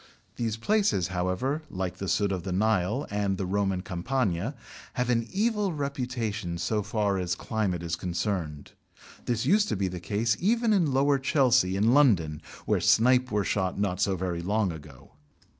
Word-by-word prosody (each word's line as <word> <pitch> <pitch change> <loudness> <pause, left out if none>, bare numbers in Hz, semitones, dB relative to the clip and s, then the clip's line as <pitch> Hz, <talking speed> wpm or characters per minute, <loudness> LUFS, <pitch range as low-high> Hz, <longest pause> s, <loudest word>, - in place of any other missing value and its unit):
These 115 -2 -2
places, 195 - +1
however, 95 - -1
like 95 -1 -4
the 95 - -5
sudd 100 +2 +1
of 95 -2 -2
the 95 +2 -5
Nile, 110 +6 +1
and 100 -2 0
the 95 - -2
Roman 95 0 0
"Campagna," 100 - -1 0.4
have 125 0 0
an 115 -1 +1
evil 210 -2 0
reputation 125 - -3
so 105 +5 -1
far 105 -2 0
as 90 -1 -1
climate 95 -5 -2
is 85 0 -2
concerned. 85 -4 -3 0.5
This 120 0 -1
used 205 +7 +3
to - - 0
be 95 -1 0
the 90 -1 -5
case 105 +4 0
even 225 +3 +2
in 170 -8 +2
lower 140 +1 +3
Chelsea, 130 - +3
in 110 +5 +3
London 90 - +3 0.2
(where - - +1
snipe 125 +2 +4
were 105 -2 0
shot 95 -1 -1
not 100 -2 -1
so 95 -1 +2
very 90 -2 -3
long 100 +1 0
ago). 75 -5 -12
105 Hz, 170 wpm, -27 LUFS, 90-130 Hz, 0.5 s, snipe